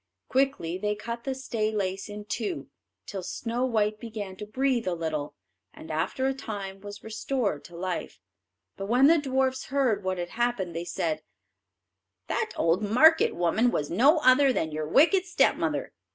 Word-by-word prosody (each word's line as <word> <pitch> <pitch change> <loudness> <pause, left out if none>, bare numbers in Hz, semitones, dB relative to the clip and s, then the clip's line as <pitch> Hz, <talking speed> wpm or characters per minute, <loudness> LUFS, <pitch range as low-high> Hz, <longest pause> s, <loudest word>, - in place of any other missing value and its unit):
Quickly 255 -11 0
they 210 +1 0
cut 235 +2 -6
the 270 -1 -1
stay 230 -5 -2
lace 195 -1 -2
in 205 0 -7
two, 340 - -3 0.4
till 195 -2 -5
Snow 235 +7 -2
white 215 -3 0
began 215 -4 -6
to 210 - -7
breathe 255 0 0
a 180 - 0
little, 155 -3 -3 0.4
and - - -9
after 260 - -1
a 270 - +2
time 200 -7 -6
was 205 0 -9
restored 220 - -2
to 175 - -12
life. 180 0 -4 0.6
But 195 - -5
when 250 +5 +4
the 325 +3 +6
dwarfs 265 -1 0
heard 255 -7 +1
what 185 0 -1
had 175 0 -4
happened, 225 -7 -1
they 170 +1 -3
said: 160 -2 -2 1.0
"That - - -1
old 165 +4 +2
market 250 +10 +5
woman 175 +8 +2
was 150 -10 -2
no 270 - +5
other 265 +1 +6
than 160 -10 -1
your 155 0 -3
wicked 345 - +4
stepmother. 355 - +1
215 Hz, 165 wpm, -27 LUFS, 185-260 Hz, 1.0 s, the